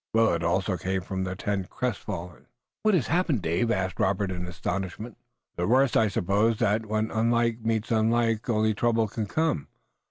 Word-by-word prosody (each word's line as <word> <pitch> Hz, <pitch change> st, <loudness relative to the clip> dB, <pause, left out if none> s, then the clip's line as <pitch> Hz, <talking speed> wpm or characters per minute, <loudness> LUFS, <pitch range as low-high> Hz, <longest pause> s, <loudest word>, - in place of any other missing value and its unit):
Willet 110 Hz, -7 st, +3 dB
also 90 Hz, +2 st, 0 dB
came 95 Hz, +2 st, -2 dB
from 95 Hz, 0 st, -3 dB
the 95 Hz, 0 st, -4 dB
tent, 100 Hz, -1 st, -2 dB
crestfallen. 95 Hz, -8 st, -4 dB, 0.3 s
"What 215 Hz, -2 st, +3 dB
has 150 Hz, -10 st, +1 dB
happened, 165 Hz, -, +1 dB
Dave?" 85 Hz, +8 st, +1 dB
asked 95 Hz, -4 st, -1 dB
Robert 95 Hz, 0 st, +1 dB
in 90 Hz, -1 st, -4 dB
astonishment. 95 Hz, +5 st, -4 dB, 0.4 s
"The 85 Hz, -, 0 dB
worst. 130 Hz, +3 st, +3 dB
I 110 Hz, -, +4 dB
suppose 105 Hz, +4 st, +1 dB
that 110 Hz, -1 st, +1 dB
when 110 Hz, +1 st, -1 dB
unlike 115 Hz, +1 st, +1 dB
meets 115 Hz, 0 st, -1 dB
unlike 115 Hz, 0 st, +1 dB
only 110 Hz, -1 st, +2 dB
trouble 115 Hz, +1 st, +1 dB
can 105 Hz, +1 st, -4 dB
come. 155 Hz, -, 0 dB
110 Hz, 165 wpm, -27 LUFS, 95-115 Hz, 0.4 s, I